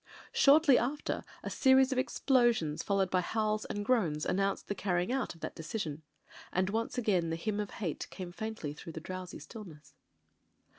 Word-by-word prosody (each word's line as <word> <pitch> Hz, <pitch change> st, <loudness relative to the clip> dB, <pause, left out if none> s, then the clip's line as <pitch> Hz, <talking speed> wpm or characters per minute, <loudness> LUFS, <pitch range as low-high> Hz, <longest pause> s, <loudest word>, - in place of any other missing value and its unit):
Shortly 285 Hz, -2 st, +6 dB
after 275 Hz, +5 st, -2 dB, 0.2 s
a -, -, -4 dB
series 265 Hz, 0 st, +5 dB
of 260 Hz, -, +1 dB
explosions, 240 Hz, -, +2 dB
followed 195 Hz, -2 st, +1 dB
by 185 Hz, -, +3 dB
howls 215 Hz, +2 st, -1 dB
and 205 Hz, 0 st, -4 dB
groans, 175 Hz, -12 st, +1 dB
announced 195 Hz, +1 st, 0 dB
the -, -, -1 dB
carrying 185 Hz, +1 st, 0 dB
out 260 Hz, -8 st, -1 dB
of 165 Hz, -, -18 dB
that -, -, -4 dB
de -, -, -8 dB
cision. 160 Hz, -4 st, -4 dB, 0.5 s
And 185 Hz, +1 st, +1 dB
once 230 Hz, +3 st, -2 dB
again 190 Hz, -8 st, +1 dB
the 165 Hz, -, -1 dB
Hymn 205 Hz, +5 st, -2 dB
of 205 Hz, -1 st, -2 dB
Hate 175 Hz, -8 st, -4 dB
came 180 Hz, -2 st, -7 dB
faintly 220 Hz, -5 st, -5 dB
through 160 Hz, +2 st, -9 dB
the 160 Hz, -, -5 dB
drowsy 185 Hz, +2 st, -6 dB
stillness. 175 Hz, -10 st, -11 dB
200 Hz, 180 wpm, -32 LUFS, 170-230 Hz, 0.5 s, Shortly